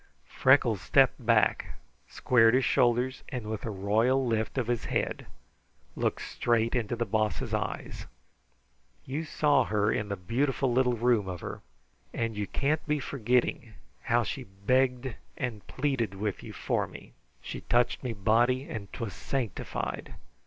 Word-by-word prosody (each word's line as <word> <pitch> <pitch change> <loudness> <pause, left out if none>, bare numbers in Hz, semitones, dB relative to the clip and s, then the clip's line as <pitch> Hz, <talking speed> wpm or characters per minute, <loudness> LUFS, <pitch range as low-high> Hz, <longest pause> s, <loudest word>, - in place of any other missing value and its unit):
Freckles 125 -7 +3
stepped 135 -2 +3
back, 115 -1 +2 0.3
squared 115 -1 +4
his 130 - +3
shoulders, 125 +2 +2
and 125 -4 -5
with 110 -1 -4
a - - -2
royal 110 +7 +2
lift 110 +1 -1
of 130 - +1
his 120 -1 -1
head - - -2 0.7
looked - - -1
straight 115 -1 0
into 120 -2 -1
the 120 0 -1
Boss's 110 -1 -1
eyes. - - -3 1.0
"You 145 +5 -3
saw 145 -3 +3
her 105 0 +1
in 105 -1 -2
the 100 - -1
beautiful 125 +7 0
little 125 0 +2
room 115 -4 +2
of 90 -2 -5
her, - - -6 0.5
and 115 -1 -1
you 105 -1 -2
can't 150 +2 0
be 150 0 +1
forgetting 120 -3 0 0.3
how 120 -1 +2
she 130 +3 -5
begged 125 +6 0 0.2
and 120 -5 -4
plead 130 -7 -1
with 100 0 -3
you - - -9
for - - -1
me. - - -13 0.3
She - - -7
touched 120 0 +1
me 125 - -2
body, 120 +6 +2
and 105 -3 -6
'twas 110 -5 -4
sanctified. 120 0 -4
120 Hz, 150 wpm, -29 LUFS, 110-130 Hz, 1.0 s, squared